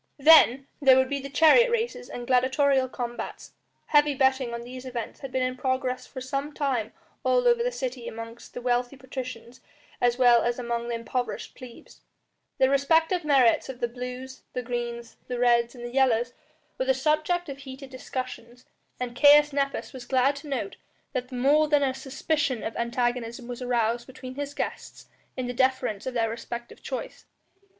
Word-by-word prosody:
Then 275 Hz, -3 st, +7 dB, 0.2 s
there 265 Hz, -2 st, +7 dB
would 260 Hz, 0 st, +3 dB
be 280 Hz, 0 st, -1 dB
the 275 Hz, +1 st, -7 dB
chariot 325 Hz, -, +6 dB
races 475 Hz, +1 st, -2 dB
and 245 Hz, -, -6 dB
gladiatorial 260 Hz, +1 st, +2 dB
combats; 240 Hz, -1 st, -6 dB, 0.3 s
heavy 295 Hz, -1 st, +3 dB
betting 265 Hz, -2 st, +2 dB
on 235 Hz, 0 st, -5 dB
these 250 Hz, +1 st, -9 dB
events 245 Hz, -3 st, -6 dB
had 270 Hz, -, -7 dB
been 260 Hz, 0 st, 0 dB
in 255 Hz, 0 st, -1 dB
progress 260 Hz, 0 st, -2 dB
for -, -, -8 dB
some 275 Hz, +3 st, -3 dB
time 260 Hz, -8 st, -1 dB, 0.3 s
all -, -, +3 dB
over 475 Hz, -1 st, +4 dB
the -, -, 0 dB
city 255 Hz, -, -5 dB
among 230 Hz, +1 st, -7 dB
the 245 Hz, -, -7 dB
wealthy 245 Hz, +1 st, 0 dB
patricians 255 Hz, -2 st, -8 dB, 0.4 s
as 245 Hz, 0 st, +3 dB
well 245 Hz, -2 st, +6 dB
as 240 Hz, 0 st, 0 dB
among 235 Hz, -1 st, -3 dB
the 240 Hz, -, -2 dB
impoverished 245 Hz, +2 st, -4 dB
plebs; 250 Hz, -2 st, -13 dB, 0.6 s
the 260 Hz, -, +4 dB
respective 320 Hz, +6 st, +2 dB
merits 270 Hz, -5 st, +3 dB
of 255 Hz, -2 st, -7 dB
the 240 Hz, -, 0 dB
blues, 250 Hz, +2 st, -7 dB
the 250 Hz, -, -3 dB
greens, 235 Hz, -1 st, -5 dB
the 250 Hz, -, -3 dB
reds, 240 Hz, 0 st, +3 dB
and 240 Hz, -, -10 dB
the 240 Hz, -, -7 dB
yellows 245 Hz, -2 st, +2 dB, 0.5 s
were 260 Hz, -, 0 dB
the 265 Hz, 0 st, +3 dB
subject 310 Hz, +5 st, +1 dB
of 275 Hz, -1 st, -7 dB
heated 270 Hz, 0 st, -10 dB
discussions, 255 Hz, -1 st, -7 dB, 0.3 s
and 245 Hz, -1 st, -4 dB
Caius 295 Hz, +2 st, +6 dB
Nepos 275 Hz, 0 st, -2 dB
was 255 Hz, -2 st, -8 dB
glad 265 Hz, +2 st, +3 dB
to 295 Hz, -, -10 dB
note 245 Hz, -8 st, -3 dB, 0.4 s
that 250 Hz, +1 st, -3 dB
more 280 Hz, +5 st, +3 dB
than 295 Hz, -1 st, +3 dB
a 265 Hz, -1 st, +1 dB
suspicion 270 Hz, -1 st, -2 dB
of 220 Hz, -, -4 dB
antagonism 235 Hz, 0 st, -2 dB
was 245 Hz, 0 st, -6 dB
aroused 240 Hz, -1 st, 0 dB
between 255 Hz, 0 st, -9 dB
his 285 Hz, +1 st, -5 dB
guests -, -, -5 dB, 0.3 s
in 255 Hz, -, -2 dB
the 245 Hz, -, -3 dB
defence 260 Hz, -4 st, 0 dB
of 255 Hz, -, -4 dB
their 230 Hz, -1 st, +2 dB
respective 235 Hz, +1 st, -7 dB
choice. -, -, -6 dB
255 Hz, 175 wpm, -26 LUFS, 240-275 Hz, 0.6 s, Then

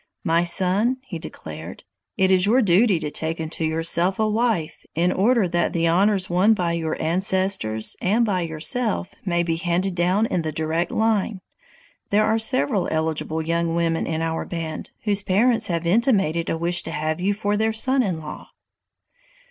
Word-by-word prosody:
"My 165 Hz, -2 st, +2 dB
son," 190 Hz, +8 st, +1 dB
he 180 Hz, -11 st, -7 dB
declared, 80 Hz, -, -9 dB, 0.3 s
"it 190 Hz, 0 st, +3 dB
is 185 Hz, +1 st, +4 dB
your 245 Hz, +4 st, +4 dB
duty 195 Hz, 0 st, +3 dB
to 150 Hz, -1 st, -4 dB
take 160 Hz, +2 st, -4 dB
unto 160 Hz, 0 st, -4 dB
yourself 165 Hz, +3 st, +1 dB
a 220 Hz, -, +1 dB
wife, 215 Hz, -7 st, -1 dB
in 175 Hz, +3 st, +2 dB
order 220 Hz, +1 st, +2 dB
that 175 Hz, 0 st, 0 dB
the 170 Hz, 0 st, +1 dB
honors 190 Hz, +3 st, +2 dB
won 190 Hz, +6 st, +3 dB
by 175 Hz, -4 st, -1 dB
your 160 Hz, -2 st, -3 dB
ancestors 180 Hz, -, +1 dB
and 220 Hz, +6 st, +2 dB
by 190 Hz, -4 st, 0 dB
yourself 180 Hz, +7 st, -2 dB
may 175 Hz, -2 st, +1 dB
be 165 Hz, -1 st, -1 dB
handed 180 Hz, +2 st, -1 dB
down 180 Hz, +5 st, +1 dB
in 180 Hz, -, -1 dB
the 160 Hz, -1 st, -3 dB
direct 160 Hz, +3 st, -1 dB
line. 220 Hz, -2 st, 0 dB, 0.7 s
There 210 Hz, +1 st, +3 dB
are 220 Hz, +1 st, +1 dB
several 220 Hz, -4 st, +1 dB
eligible 160 Hz, 0 st, -1 dB
young 165 Hz, +1 st, -1 dB
women 165 Hz, -1 st, 0 dB
in 160 Hz, 0 st, -2 dB
our 165 Hz, 0 st, -2 dB
band 165 Hz, -2 st, -5 dB
whose 205 Hz, -2 st, +1 dB
parents 220 Hz, +5 st, +2 dB
have 170 Hz, -1 st, -2 dB
intimated 195 Hz, -, +1 dB
a 165 Hz, -, -1 dB
wish 175 Hz, +2 st, +2 dB
to 165 Hz, -, -6 dB
have 155 Hz, +1 st, -2 dB
you 200 Hz, +2 st, +1 dB
for 205 Hz, 0 st, -1 dB
their 220 Hz, +1 st, +1 dB
son 260 Hz, +5 st, +2 dB
in 185 Hz, -8 st, -2 dB
law." 150 Hz, -, -9 dB
180 Hz, 175 wpm, -22 LUFS, 165-210 Hz, 0.7 s, is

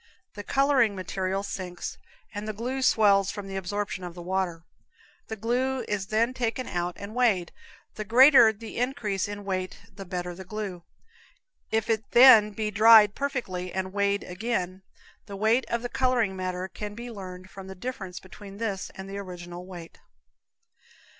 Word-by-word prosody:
The 205 Hz, -, -7 dB
coloring 270 Hz, -4 st, +3 dB
material 190 Hz, +1 st, -2 dB
sinks, 180 Hz, -3 st, -6 dB, 0.3 s
and 205 Hz, +1 st, -5 dB
the 215 Hz, -, -3 dB
glue 250 Hz, +5 st, -3 dB
swells 200 Hz, -6 st, +4 dB
from 205 Hz, -2 st, -6 dB
the 195 Hz, -, -6 dB
absorption 195 Hz, 0 st, -3 dB
of 175 Hz, -1 st, -7 dB
the 175 Hz, -, -8 dB
water. 180 Hz, -2 st, -2 dB, 0.6 s
The 220 Hz, -, -4 dB
glue 250 Hz, +4 st, -1 dB
is 200 Hz, -2 st, -2 dB
then 230 Hz, +4 st, +1 dB
taken 250 Hz, 0 st, -2 dB
out 175 Hz, 0 st, -2 dB
and 200 Hz, +2 st, -8 dB
weighed; 220 Hz, -8 st, +2 dB, 0.4 s
the 215 Hz, -, -5 dB
greater 245 Hz, +2 st, +7 dB
the 220 Hz, +1 st, -10 dB
increase 235 Hz, -7 st, -1 dB
in 205 Hz, 0 st, -7 dB
weight 185 Hz, -1 st, -3 dB, 0.2 s
the 195 Hz, +1 st, -8 dB
better 180 Hz, -1 st, -4 dB
the 190 Hz, +2 st, -9 dB
glue. 195 Hz, -2 st, -5 dB, 0.9 s
If 220 Hz, -1 st, 0 dB
it 220 Hz, -1 st, -1 dB
then 235 Hz, -4 st, +9 dB
be 210 Hz, 0 st, -3 dB
dried 215 Hz, 0 st, +7 dB
perfectly 210 Hz, -11 st, -3 dB
and 190 Hz, 0 st, -3 dB
weighed 200 Hz, 0 st, +1 dB
again, 185 Hz, -1 st, -3 dB, 0.5 s
the 200 Hz, -, -7 dB
weight 220 Hz, +5 st, +2 dB
of 235 Hz, 0 st, -1 dB
the -, -, -1 dB
coloring 245 Hz, -6 st, +1 dB
matter 185 Hz, 0 st, -3 dB
can 205 Hz, +1 st, -7 dB
be 240 Hz, +2 st, -7 dB
learned 185 Hz, -3 st, -9 dB
from 195 Hz, -1 st, -10 dB
the 190 Hz, -, -8 dB
difference 190 Hz, -3 st, -6 dB
between 195 Hz, +1 st, -12 dB
this 200 Hz, -3 st, -3 dB
and 190 Hz, 0 st, -8 dB
the 200 Hz, +1 st, -6 dB
original 175 Hz, -1 st, -8 dB
weight. 175 Hz, -3 st, -10 dB
200 Hz, 165 wpm, -27 LUFS, 185-230 Hz, 0.9 s, then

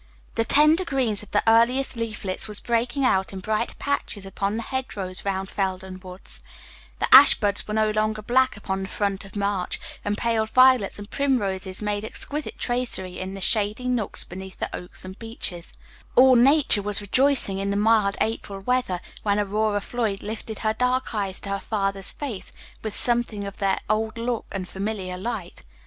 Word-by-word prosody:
The 225 Hz, -, +1 dB
tender 305 Hz, +8 st, +5 dB
green 270 Hz, -8 st, 0 dB
of 210 Hz, 0 st, -4 dB
the 205 Hz, -, +1 dB
earliest 235 Hz, +4 st, +4 dB
leaflets 215 Hz, -5 st, -2 dB
was 210 Hz, -1 st, -2 dB
breaking 240 Hz, +3 st, 0 dB
out 190 Hz, -5 st, +2 dB
in 190 Hz, -, -5 dB
bright 215 Hz, +4 st, -2 dB
patches 255 Hz, -8 st, -2 dB
upon 195 Hz, +2 st, -2 dB
the 230 Hz, -, -3 dB
hedge 260 Hz, 0 st, -4 dB
rows 185 Hz, -2 st, -3 dB
round 195 Hz, -1 st, -2 dB
Felden 190 Hz, -1 st, -3 dB
Woods; 185 Hz, 0 st, -7 dB, 0.6 s
the -, -, 0 dB
ashbuds 215 Hz, -7 st, +7 dB
were 215 Hz, -, -3 dB
no 215 Hz, 0 st, +2 dB
longer 215 Hz, 0 st, -1 dB
black 255 Hz, +1 st, +2 dB
upon 195 Hz, -1 st, -3 dB
the 190 Hz, -, -4 dB
front 200 Hz, -2 st, -2 dB
of 195 Hz, -, -14 dB
March, 200 Hz, -2 st, -1 dB, 0.2 s
and 205 Hz, 0 st, -1 dB
pale 225 Hz, -2 st, 0 dB
violets 255 Hz, -3 st, +4 dB
and 205 Hz, 0 st, -10 dB
primroses 200 Hz, -9 st, -1 dB
made 205 Hz, 0 st, -1 dB
exquisite 290 Hz, +6 st, -4 dB
tracery 240 Hz, -7 st, -1 dB
in 190 Hz, +1 st, -5 dB
the 195 Hz, -, -7 dB
shady 215 Hz, +5 st, +2 dB
nooks 245 Hz, -5 st, 0 dB
beneath 190 Hz, +1 st, -9 dB
the -, -, -4 dB
oaks 180 Hz, +1 st, -9 dB
and 190 Hz, +1 st, -9 dB
beeches; 215 Hz, -7 st, -4 dB, 0.4 s
all 260 Hz, +1 st, +7 dB
nature 265 Hz, -2 st, +5 dB
was 205 Hz, 0 st, +2 dB
rejoicing 220 Hz, -1 st, +1 dB
in 195 Hz, 0 st, -2 dB
the 200 Hz, -, 0 dB
mild 210 Hz, -1 st, +3 dB
April 205 Hz, -3 st, -2 dB
weather 220 Hz, -5 st, 0 dB, 0.2 s
when 205 Hz, -1 st, +1 dB
Aurora 210 Hz, 0 st, 0 dB
Floyd 220 Hz, -3 st, -2 dB
lifted 220 Hz, 0 st, -6 dB
her 215 Hz, -, +2 dB
dark 250 Hz, +2 st, 0 dB
eyes 195 Hz, -3 st, -2 dB
to 200 Hz, -, -5 dB
her 200 Hz, 0 st, -1 dB
father's 195 Hz, -2 st, 0 dB
face 255 Hz, -10 st, -5 dB, 0.3 s
with 215 Hz, -2 st, -5 dB
something 235 Hz, -4 st, +1 dB
of 200 Hz, 0 st, -7 dB
their 195 Hz, -1 st, +1 dB
old 220 Hz, +1 st, -1 dB
look 235 Hz, 0 st, -2 dB
and 190 Hz, -2 st, -4 dB
familiar 190 Hz, -2 st, -4 dB
light. 215 Hz, -4 st, -5 dB
210 Hz, 180 wpm, -24 LUFS, 195-235 Hz, 0.6 s, ashbuds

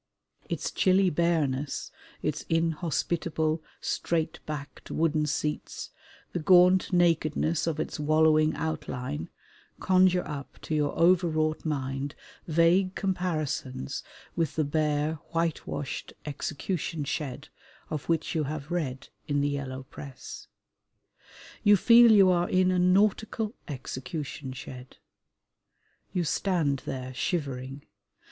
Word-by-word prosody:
Its -, -, -2 dB
chilly 190 Hz, -1 st, +3 dB
bareness, 150 Hz, -4 st, 0 dB, 0.3 s
its -, -, -1 dB
inhospitable, 165 Hz, 0 st, 0 dB, 0.2 s
straight 165 Hz, -2 st, -1 dB
backed 150 Hz, -1 st, -7 dB
wooden 155 Hz, -1 st, +1 dB
seats, 150 Hz, +1 st, -3 dB, 0.4 s
the 175 Hz, -, -1 dB
gaunt 180 Hz, +3 st, +5 dB
nakedness 165 Hz, -2 st, +2 dB
of 160 Hz, -2 st, -1 dB
its 160 Hz, -, -3 dB
wallowing 155 Hz, +1 st, +4 dB
outline, 125 Hz, -, -4 dB, 0.5 s
conjure 185 Hz, -1 st, +3 dB
up 140 Hz, -3 st, -7 dB
to -, -, -5 dB
your 150 Hz, -2 st, +1 dB
overwrought 165 Hz, -3 st, +3 dB
mind 135 Hz, -2 st, -2 dB, 0.3 s
vague 170 Hz, +4 st, +3 dB
comparisons 155 Hz, -, -2 dB, 0.3 s
with 165 Hz, -4 st, -1 dB
the 155 Hz, -, +2 dB
bare, 150 Hz, +1 st, 0 dB
whitewashed 165 Hz, -4 st, -2 dB
execution 150 Hz, +2 st, -3 dB
shed 140 Hz, -2 st, -4 dB, 0.4 s
of 150 Hz, 0 st, -4 dB
which 165 Hz, -1 st, 0 dB
you 155 Hz, -3 st, 0 dB
have 150 Hz, +1 st, -5 dB
read 140 Hz, -7 st, -3 dB, 0.2 s
in 145 Hz, -2 st, +1 dB
the 145 Hz, -, +1 dB
Yellow 135 Hz, -2 st, -4 dB
Press. 135 Hz, 0 st, -10 dB, 1.2 s
You 205 Hz, 0 st, +7 dB
feel 235 Hz, +3 st, +7 dB
you 195 Hz, -3 st, +7 dB
are 175 Hz, -1 st, +1 dB
in 185 Hz, 0 st, +3 dB
a 180 Hz, -, +2 dB
Nautical 210 Hz, +4 st, +2 dB
Executionshed. 130 Hz, -2 st, -6 dB, 1.1 s
You 180 Hz, -, 0 dB
stand 160 Hz, -5 st, +1 dB
there 130 Hz, -1 st, -4 dB
shivering. 135 Hz, -2 st, -3 dB
155 Hz, 110 wpm, -28 LUFS, 145-175 Hz, 1.2 s, You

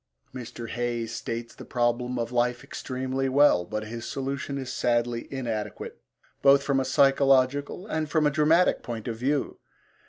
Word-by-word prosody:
Mr. 120 Hz, -2 st, -7 dB
Hayes 120 Hz, -1 st, -3 dB
states 115 Hz, 0 st, -5 dB
the -, -, -11 dB
problem 125 Hz, 0 st, 0 dB
of 115 Hz, 0 st, -2 dB
life 120 Hz, 0 st, 0 dB
extremely 130 Hz, +1 st, -3 dB
well, 135 Hz, -10 st, +5 dB
but 110 Hz, +3 st, -4 dB
his 115 Hz, +2 st, -7 dB
solution 140 Hz, +1 st, -4 dB
is 130 Hz, -2 st, -5 dB
sadly 120 Hz, -1 st, 0 dB
inadequate 115 Hz, -6 st, -4 dB, 0.4 s
both 140 Hz, 0 st, +6 dB
from 140 Hz, -1 st, +1 dB
a 135 Hz, -, 0 dB
psychological 135 Hz, +4 st, +3 dB
and 155 Hz, -7 st, -2 dB
from 155 Hz, 0 st, +2 dB
a 150 Hz, -, +3 dB
dramatic 155 Hz, +4 st, +3 dB
point 115 Hz, -2 st, -6 dB
of 115 Hz, -, -2 dB
view. 135 Hz, +4 st, -1 dB
130 Hz, 155 wpm, -26 LUFS, 120-140 Hz, 0.4 s, both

